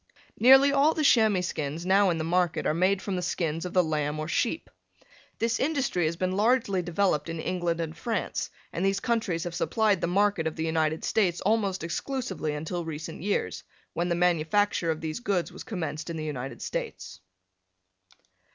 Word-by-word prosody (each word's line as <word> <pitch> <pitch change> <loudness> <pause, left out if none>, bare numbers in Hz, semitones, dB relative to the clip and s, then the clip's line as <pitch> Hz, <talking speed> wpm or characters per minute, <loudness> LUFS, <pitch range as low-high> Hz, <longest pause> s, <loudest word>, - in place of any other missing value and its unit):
Nearly 265 +3 +7
all 280 +3 +3
the 310 - 0
chamois 220 -8 +4
skins 155 0 -4
now 195 +1 +4
in 170 - 0
the 160 - -2
market 175 0 0
are - - +2
made 185 +3 +1
from 195 - -2
the 180 - -2
skins 165 -1 -2
of - - -9
the 180 - +4
lamb 150 -2 -1
or 155 - -3
sheep. 240 - -1 0.7
This 230 0 0
industry 275 - 0
has 165 - -2
been 185 +2 -1
largely 205 -1 +2
developed 175 -2 0
in 165 0 -4
England 175 -1 -1
and 160 -1 -3
France, 220 +4 -2 0.2
and 170 - -2
these 195 0 +2
countries 205 -8 -1
have 175 - -5
supplied 210 +3 +1
the - - 0
market 195 -2 +2
of 160 - -4
the 160 - -2
United 160 -1 0
States 185 -6 +1
almost 200 -4 0
exclusively 170 - -3
until 160 +4 -4
recent 160 -1 -6
years, 185 - -1 0.3
when 175 +2 -1
the 170 - +1
manufacture 175 +2 +2
of 160 0 -1
these 160 +3 -3
goods 195 -8 -1
was 185 - -9
commenced 160 -4 -4
in 165 - -4
the 155 - -4
United 135 -3 -5
States. 95 0 -5
175 Hz, 185 wpm, -27 LUFS, 160-205 Hz, 0.7 s, Nearly